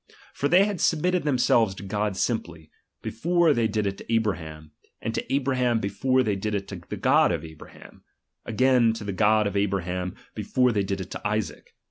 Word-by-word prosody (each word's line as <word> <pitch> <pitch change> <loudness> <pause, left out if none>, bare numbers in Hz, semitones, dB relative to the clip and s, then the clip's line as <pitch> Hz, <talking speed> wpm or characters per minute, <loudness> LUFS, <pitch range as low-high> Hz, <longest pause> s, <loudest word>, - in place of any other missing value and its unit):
For 140 - -1
they 185 +5 +5
had 205 -4 -3
submit 165 +3 +2
ted 180 -4 -1
themselves 120 -7 +2
to 100 - -9
God 105 0 -2
simply, 85 -9 -3 0.3
before 170 +4 +2
they 115 -4 +1
did 105 -1 -1
it 100 0 -3
to - - -9
Abraham, 80 -9 -2 0.3
and 115 - -4
to - - -4
Abraham 130 -3 +1
before 130 +6 +1
they 105 -4 0
did 105 +2 -2
it 100 -1 -3
to 95 -4 -7
the - - -4
God - - +4
of 80 - -3
Abraham: 80 -1 -14 0.4
again, 120 0 +3
to 110 - -7
the 100 -1 -4
God 105 +2 +3
of 100 -1 -2
Abra 100 -2 0
ham, 90 0 -4 0.2
before 125 -1 +1
they 105 -3 +1
did 95 0 -3
it 95 - -8
to - - -6
Isaac. 105 -1 -4
110 Hz, 200 wpm, -25 LUFS, 95-125 Hz, 0.4 s, they